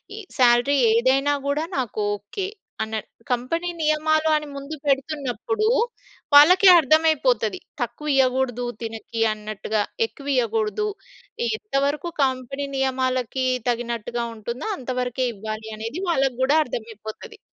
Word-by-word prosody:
ఈ -, -, -9 dB, 0.2 s
సాలరీ 245 Hz, +3 st, +5 dB, 0.2 s
ఏదైనా 265 Hz, +4 st, +3 dB
గూడా 290 Hz, +3 st, 0 dB
నాకు 235 Hz, -4 st, -2 dB, 0.2 s
ఓకే 205 Hz, -, -5 dB, 0.4 s
అన్న. 220 Hz, 0 st, -5 dB, 0.4 s
కంపెనీ 330 Hz, +9 st, -1 dB
నియమాలు 310 Hz, +1 st, +2 dB
అని 300 Hz, -1 st, -2 dB
ముందు 280 Hz, +3 st, -6 dB
పెడుతున్నప్పుడు. 285 Hz, -, -1 dB, 0.7 s
వాళ్ళకె 365 Hz, +6 st, +8 dB
అర్థమైపోతది. 275 Hz, -8 st, +2 dB, 0.2 s
తక్కువ 240 Hz, +6 st, -4 dB
ఇయ్యగూడదు 255 Hz, -2 st, +1 dB, 0.2 s
తినకి 225 Hz, 0 st, -5 dB
అన్నట్టుగా 215 Hz, 0 st, -3 dB, 0.2 s
ఎక్కువ 285 Hz, -10 st, -11 dB
ఇయ్యగూడదు. 225 Hz, -, 0 dB, 0.6 s
ఈ -, -, +1 dB
ఎంతవరకు 290 Hz, -4 st, -1 dB
కంపెనీ 265 Hz, +2 st, -2 dB
నియమాలకి 260 Hz, -1 st, 0 dB, 0.2 s
తగినట్టుగా 235 Hz, 0 st, -2 dB
ఉంటుందో 235 Hz, -, -5 dB
అంతవరకే 250 Hz, 0 st, -2 dB
ఇవ్వాలి 215 Hz, +2 st, -6 dB
అనేది 230 Hz, -, -5 dB
వాళ్ళకి 270 Hz, -6 st, +1 dB
గూడా 290 Hz, +4 st, +4 dB
అర్థమైపోతది. 225 Hz, -, -8 dB
260 Hz, 110 wpm, -23 LUFS, 235-300 Hz, 0.7 s, వాళ్ళకె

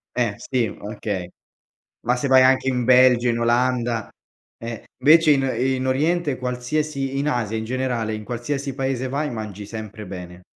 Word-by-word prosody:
Eh, 120 Hz, -4 st, +1 dB
sì 125 Hz, -3 st, -1 dB
okay. 100 Hz, -4 st, -5 dB, 0.8 s
Ma 125 Hz, +1 st, +3 dB
se 125 Hz, -, -2 dB
vai 130 Hz, -1 st, +6 dB
anche 130 Hz, +1 st, +4 dB
in 125 Hz, -2 st, 0 dB
Belgio, 125 Hz, -1 st, +5 dB
in 115 Hz, -1 st, +1 dB
Olanda, 120 Hz, -2 st, +1 dB, 0.5 s
eh. 115 Hz, -1 st, -7 dB, 0.2 s
Invece 155 Hz, +3 st, +6 dB
in 135 Hz, -2 st, +2 dB, 0.2 s
in 130 Hz, +1 st, 0 dB
Oriente 150 Hz, +2 st, +1 dB
qualsiasi 135 Hz, +2 st, -2 dB
in 145 Hz, +2 st, 0 dB
Asia 115 Hz, -6 st, -1 dB
in 110 Hz, -, -4 dB
generale, 120 Hz, -2 st, -2 dB
in 110 Hz, 0 st, -6 dB
qualsiasi 135 Hz, +4 st, -3 dB
paese 130 Hz, -1 st, -2 dB
vai 145 Hz, +3 st, -2 dB
mangi 105 Hz, -3 st, -6 dB
sempre 110 Hz, -1 st, -8 dB
bene. 90 Hz, -1 st, -9 dB
125 Hz, 160 wpm, -22 LUFS, 115-135 Hz, 0.8 s, vai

